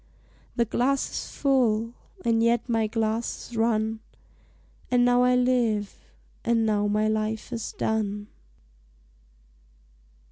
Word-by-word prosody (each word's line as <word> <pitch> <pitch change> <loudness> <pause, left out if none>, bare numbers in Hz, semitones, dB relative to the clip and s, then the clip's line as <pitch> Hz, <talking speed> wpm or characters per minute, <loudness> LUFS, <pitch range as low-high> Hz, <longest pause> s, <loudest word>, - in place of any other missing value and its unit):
The 235 - +2
glass 260 +5 0
is - - -6
full, 235 -5 +1 0.3
and 230 -1 +3
yet 235 +1 +2
my 225 -2 +1
glass 225 +2 -2
is - - -8
run; 220 -1 +1 0.9
And 245 -1 +3
now 245 0 +4
I 250 0 +4
live, 230 - 0 0.3
and 230 -1 +2
now 210 -1 +1
my 210 +1 +1
life 215 +2 -2
is 230 -2 -4
done! 210 -2 -2
225 Hz, 115 wpm, -26 LUFS, 215-245 Hz, 0.9 s, now